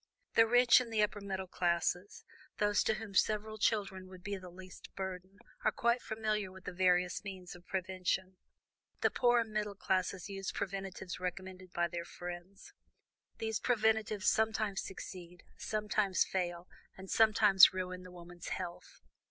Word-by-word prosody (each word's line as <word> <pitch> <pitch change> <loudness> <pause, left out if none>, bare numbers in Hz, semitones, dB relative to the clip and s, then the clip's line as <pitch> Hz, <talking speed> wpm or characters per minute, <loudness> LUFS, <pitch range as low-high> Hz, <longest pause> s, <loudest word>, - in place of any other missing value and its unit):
"The 225 0 +6
rich 245 +1 +6
and 235 -2 -6
the 215 -1 +3
upper 210 0 -1
middle 190 -1 -3
classes, 180 +1 -1 0.3
those 205 -1 +2
to 220 - +2
whom 215 -2 -7
several 215 +2 +1
children 195 -3 0
would 185 -1 -13
be 205 -1 -3
the 185 -2 -9
least 185 +1 -12
burden, 190 0 -6 0.3
are 215 - +3
quite 235 +2 +1
familiar 215 -3 -2
with 190 0 -13
the - - -6
various 180 0 +2
means 185 -3 -7
of 175 0 -16
prevention. 185 0 -2 0.6
The - - +3
poorer 240 -2 +4
middle 215 -2 -3
classes 185 -1 -1
use 195 -1 -4
preventives 190 -1 -5
recommended 185 0 -6
by 175 -1 +1
their 170 0 -4
friends; 175 +3 -9 0.6
these 220 -1 -2
preventives 220 -3 +1
sometimes 215 -2 +2
succeed, 180 -2 -9
sometimes 210 -2 +1
fail, 175 -1 -3 0.3
and 190 0 -9
sometimes 210 -3 +7
ruin 185 -1 -4
the 180 - -11
woman's 175 -1 -10
health. 175 - -6
190 Hz, 150 wpm, -34 LUFS, 180-215 Hz, 0.6 s, sometimes